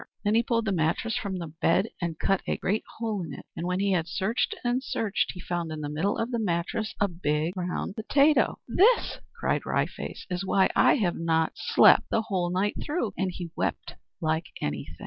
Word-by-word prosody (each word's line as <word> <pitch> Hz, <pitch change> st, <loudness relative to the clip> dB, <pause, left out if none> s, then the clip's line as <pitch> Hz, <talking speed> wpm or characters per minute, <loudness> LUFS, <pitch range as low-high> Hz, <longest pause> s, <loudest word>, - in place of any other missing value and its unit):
Then 205 Hz, -, +2 dB
he 230 Hz, -, +5 dB
pulled 230 Hz, -1 st, 0 dB
the 200 Hz, -, 0 dB
mattress 175 Hz, +6 st, 0 dB
from 195 Hz, -3 st, -2 dB
the 165 Hz, -4 st, -6 dB
bed 180 Hz, +5 st, +3 dB
and 170 Hz, -2 st, -2 dB
cut 195 Hz, +2 st, +1 dB
a -, -, 0 dB
great 210 Hz, +3 st, -1 dB
hole 220 Hz, -4 st, -2 dB
in 160 Hz, -5 st, -6 dB
it, -, -, -11 dB
and 170 Hz, -, -3 dB
when 180 Hz, +1 st, 0 dB
he 200 Hz, 0 st, +1 dB
had 170 Hz, -3 st, +1 dB
searched 200 Hz, +7 st, -1 dB
and 245 Hz, +1 st, +1 dB
searched 215 Hz, -5 st, -1 dB
he 180 Hz, -, -10 dB
found 175 Hz, -2 st, -3 dB
in 155 Hz, -1 st, -5 dB
the 145 Hz, -, -3 dB
middle 165 Hz, +7 st, 0 dB
of 230 Hz, +2 st, -2 dB
the 235 Hz, -, 0 dB
mattress 190 Hz, +2 st, -1 dB
a 205 Hz, -, +3 dB
big 165 Hz, -2 st, -1 dB
brown 180 Hz, +1 st, -3 dB
potato! 280 Hz, +8 st, +3 dB
"This," 455 Hz, +5 st, +3 dB, 0.2 s
cried -, -, 0 dB
Wry -, -, +1 dB
Face, -, -, -8 dB
"is 180 Hz, +1 st, -1 dB
why 190 Hz, 0 st, +3 dB
I -, -, +6 dB
have 195 Hz, -10 st, 0 dB
not 160 Hz, -1 st, +1 dB
slept -, -, +5 dB
the 225 Hz, -, +1 dB
whole 185 Hz, -5 st, -1 dB
night 190 Hz, +3 st, 0 dB
through!" 295 Hz, -, -2 dB
and 190 Hz, 0 st, 0 dB
he 175 Hz, -2 st, -6 dB
wept -, -, -2 dB, 0.3 s
like 160 Hz, +1 st, 0 dB
anything. 75 Hz, -1 st, -4 dB
185 Hz, 210 wpm, -27 LUFS, 170-220 Hz, 0.3 s, I